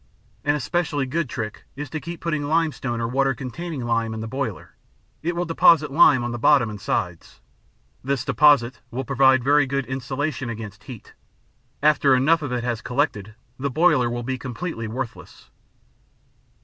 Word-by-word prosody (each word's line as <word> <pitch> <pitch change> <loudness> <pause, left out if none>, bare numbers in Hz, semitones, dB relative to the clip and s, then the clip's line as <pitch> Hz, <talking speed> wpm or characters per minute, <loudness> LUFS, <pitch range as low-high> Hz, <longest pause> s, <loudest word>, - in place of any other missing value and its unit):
An 145 0 +2
especially 150 -1 -1
good 150 +2 -2
trick 110 -3 -6
is 145 +2 -5
to 155 - -3
keep 170 +2 -8
putting 155 -4 -2
limestone 150 -6 0
or 115 - -1
water 135 +2 +1
containing 140 +2 -6
lime 115 -1 0
in - - -5
the 110 - -5
boiler; 125 -3 -5 0.5
it 170 +2 -2
will 175 +1 -1
deposit 165 -3 +4
lime 140 -3 +5
on 120 - -3
the 120 - -5
bottom 125 -3 +4
and 105 -1 -9
sides. 90 -4 -3 0.6
This 135 -1 -1
deposit 135 -1 +4
will 130 +2 -4
provide 130 -1 +4
very 145 +1 +4
good 140 0 -1
insulation 130 +1 -3
against 110 -3 -8
heat; 125 -6 -11 0.7
after 145 -3 +4
enough 155 +6 +3
of 145 -4 -4
it 125 -1 -2
has 120 -3 -2
collected, 110 -6 -2 0.2
the 140 +2 -1
boiler 150 -4 +3
will 120 0 -4
be 130 +1 -3
completely 125 -2 -5
worthless. 120 +2 -7
130 Hz, 165 wpm, -23 LUFS, 120-150 Hz, 0.7 s, lime